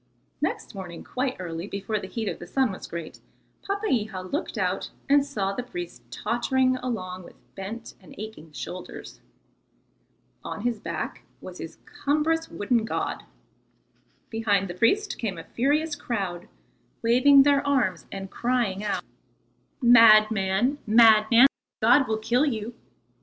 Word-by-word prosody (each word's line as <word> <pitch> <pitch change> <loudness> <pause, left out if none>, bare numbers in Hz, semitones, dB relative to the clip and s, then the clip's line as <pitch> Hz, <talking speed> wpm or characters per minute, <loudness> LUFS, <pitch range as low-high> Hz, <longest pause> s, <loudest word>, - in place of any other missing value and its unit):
Next - - -2
morning 185 -4 -8
quite 255 0 -2
early, 170 0 -5
before 200 +2 -3
the 190 - -7
heat 225 +1 -4
of - - -3
the 175 - -9
sun 260 +3 +1
was 190 - -8
great, 170 -2 -7 0.4
Papeiha 245 - -1
looked 295 - -3
out - - -1 0.2
and 285 0 +5
saw 205 -9 -2
the 225 - -3
priest 175 - -7
tottering 255 - +1
along 185 -8 -4
with 175 - -14 0.2
bent 220 +5 -7
and - - -15
aching 215 -7 -9
shoulders. 180 +4 -8 1.2
On - - -6
his 235 -1 -1
back - - -5 0.2
was - - -10
his - - -8
cumbrous 320 +3 0
wooden 230 +2 0
god. 225 - -3 1.1
Behind 205 -4 +1
the 175 - -5
priest 385 - +1
came 200 -6 -3
a 165 - -7
furious 295 +5 0
crowd, 195 -10 -4 0.6
waving 265 +4 +6
their 280 0 +4
arms 215 -11 +1
and 195 -1 -7
crying 235 -5 0
out: 195 -4 -2 0.8
"Madman, 220 +1 +5
madman, 225 +2 +7 0.3
the - - 0
god 260 +3 +6
will 220 - 0
kill 240 +7 +1
you." 225 -2 -3
225 Hz, 140 wpm, -26 LUFS, 195-255 Hz, 1.2 s, madman